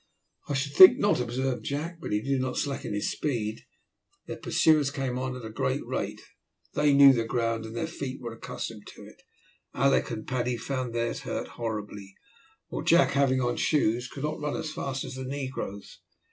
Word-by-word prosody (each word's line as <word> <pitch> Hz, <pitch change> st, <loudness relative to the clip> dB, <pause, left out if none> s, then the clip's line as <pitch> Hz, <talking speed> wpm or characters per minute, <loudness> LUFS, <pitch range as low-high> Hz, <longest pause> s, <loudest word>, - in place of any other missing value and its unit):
"I 145 Hz, -, 0 dB
should 140 Hz, +1 st, -2 dB
think 185 Hz, +5 st, +10 dB
not," 205 Hz, -8 st, +2 dB
observed 125 Hz, +1 st, -2 dB
Jack, 160 Hz, +4 st, -4 dB
but -, -, -5 dB
he 105 Hz, +1 st, 0 dB
did 135 Hz, -1 st, 0 dB
not 130 Hz, 0 st, -2 dB
slacken 140 Hz, -6 st, -2 dB
his 105 Hz, -, -1 dB
speed. 115 Hz, -7 st, -2 dB, 0.6 s
Their -, -, -6 dB
pursuers 155 Hz, -3 st, +3 dB
came 135 Hz, -3 st, -3 dB
on 130 Hz, 0 st, -3 dB
at 125 Hz, -3 st, -8 dB
a 110 Hz, -, -7 dB
great -, -, -1 dB
rate. -, -, -3 dB, 0.5 s
They 150 Hz, 0 st, +3 dB
knew 140 Hz, -1 st, +8 dB
the 115 Hz, -2 st, 0 dB
ground 115 Hz, -1 st, -1 dB
and 110 Hz, -, -9 dB
their 120 Hz, -, -1 dB
feet 140 Hz, -5 st, -6 dB
were 120 Hz, -3 st, -6 dB
accustomed 115 Hz, -1 st, -7 dB
to -, -, -12 dB
it. -, -, -16 dB, 0.5 s
Alick 135 Hz, +2 st, +2 dB
and 110 Hz, -3 st, -5 dB
Paddy 125 Hz, -1 st, -1 dB
found 130 Hz, -1 st, -3 dB
theirs 115 Hz, 0 st, -1 dB
hurt -, -, -4 dB
horribly, 105 Hz, -4 st, -6 dB, 0.5 s
while -, -, -4 dB
Jack, 170 Hz, +1 st, +4 dB
having 135 Hz, -2 st, +2 dB
on 120 Hz, -1 st, 0 dB
shoes, 125 Hz, -5 st, +1 dB
could 135 Hz, +2 st, -8 dB
not 150 Hz, +1 st, -2 dB
run 150 Hz, -1 st, -2 dB
as 155 Hz, -, -4 dB
fast 135 Hz, -2 st, -3 dB
as -, -, -7 dB
the 130 Hz, 0 st, -6 dB
negroes. 130 Hz, -7 st, -6 dB
130 Hz, 190 wpm, -28 LUFS, 115-140 Hz, 0.6 s, think